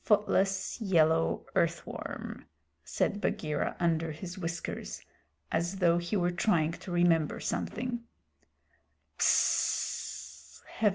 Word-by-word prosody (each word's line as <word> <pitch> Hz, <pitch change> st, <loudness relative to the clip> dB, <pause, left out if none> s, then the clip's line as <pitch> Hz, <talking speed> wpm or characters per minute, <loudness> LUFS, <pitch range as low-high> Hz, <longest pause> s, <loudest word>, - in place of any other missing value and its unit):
"Footless, 195 Hz, -1 st, +2 dB
yellow 165 Hz, -5 st, +3 dB
earth 170 Hz, 0 st, +1 dB
worm," -, -, -7 dB, 0.4 s
said 205 Hz, -1 st, -1 dB
Bagheera 150 Hz, -7 st, -1 dB
under 165 Hz, -2 st, +1 dB
his 175 Hz, +4 st, -7 dB
whiskers, 170 Hz, -2 st, -5 dB, 0.5 s
as 170 Hz, +3 st, 0 dB
though 175 Hz, -2 st, +4 dB
he 175 Hz, +4 st, -1 dB
were 175 Hz, -1 st, +2 dB
trying 175 Hz, -3 st, +2 dB
to 175 Hz, +2 st, -8 dB
remember 170 Hz, -3 st, +3 dB
something. 240 Hz, +1 st, -2 dB
175 Hz, 95 wpm, -30 LUFS, 165-195 Hz, 0.5 s, though